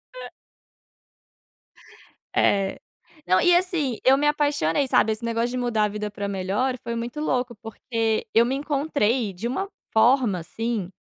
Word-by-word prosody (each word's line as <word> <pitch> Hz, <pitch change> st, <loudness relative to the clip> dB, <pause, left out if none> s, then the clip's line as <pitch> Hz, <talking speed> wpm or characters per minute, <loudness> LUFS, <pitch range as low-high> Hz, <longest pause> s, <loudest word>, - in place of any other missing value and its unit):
É. -, -, -8 dB, 2.1 s
É. 195 Hz, -1 st, +2 dB, 0.5 s
Não, 185 Hz, -, +4 dB
e 355 Hz, 0 st, +5 dB
assim, 345 Hz, -, 0 dB
eu 265 Hz, +1 st, +6 dB
me 295 Hz, -, +1 dB
apaixonei, 290 Hz, -, +1 dB
sabe, 220 Hz, -, +3 dB
esse 215 Hz, +1 st, -5 dB
negócio 230 Hz, +1 st, 0 dB
de 255 Hz, -, -4 dB
mudar 240 Hz, -3 st, 0 dB
a -, -, +1 dB
vida 210 Hz, 0 st, -4 dB
pra 205 Hz, 0 st, -5 dB
melhor, 200 Hz, +7 st, -1 dB
foi 235 Hz, -1 st, -4 dB
muito 235 Hz, +4 st, -5 dB
louco, 255 Hz, -5 st, -1 dB
porque 225 Hz, 0 st, -2 dB
eu 230 Hz, +1 st, +5 dB
me 260 Hz, -, -1 dB
encontrei 275 Hz, -7 st, 0 dB
de 195 Hz, +6 st, -4 dB
uma 325 Hz, +11 st, -3 dB, 0.2 s
forma 225 Hz, -3 st, +3 dB
assim 215 Hz, +3 st, -3 dB
235 Hz, 150 wpm, -24 LUFS, 210-270 Hz, 2.1 s, eu